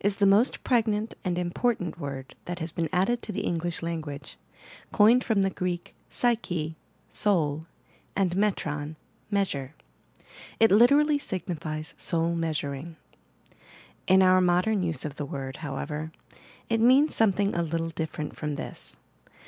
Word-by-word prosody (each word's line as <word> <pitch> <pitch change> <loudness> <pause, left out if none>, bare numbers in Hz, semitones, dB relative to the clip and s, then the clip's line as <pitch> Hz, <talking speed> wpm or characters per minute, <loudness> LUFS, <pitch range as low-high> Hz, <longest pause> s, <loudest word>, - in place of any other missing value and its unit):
the 205 - +3
most 200 +6 +3
pregnant 220 -3 +1
and 180 -3 -1
important 180 0 -1
word 135 -3 -6
that 175 0 -4
has 165 -1 -3
been 165 0 -2
added 195 +7 +1
to - - -5
the 205 - -2
English 170 0 -2
language, 155 -4 -5 0.6
coined 235 +4 +5
from 210 -4 +2
the 195 - +1
Greek 180 -2 -3 0.2
{psyche 175 -10 -1 0.2
— - - -37
80ul 160 -6 +1 0.5
and 185 -3 +1
metron 155 -7 -1 0.2
— - - -37
measure). 140 -7 -2 0.8
It 225 -2 +6
literally 285 +8 +5
signifies 165 - -4
'Soul 165 0 0
Measuring,' 160 -1 -3 1.1
In 190 +1 +6
our 185 0 +5
modem 180 +4 +2
use 165 -4 -2
of 150 -1 -5
the 145 - -3
word, 135 -1 -5
however, 150 +1 -4 0.6
it 225 -1 +1
means 265 +6 +5
something 205 -2 +3
a 170 - 0
little 165 0 -2
different 160 -2 -4
from 150 -1 -3
this. - - -6
175 Hz, 140 wpm, -27 LUFS, 155-210 Hz, 1.1 s, It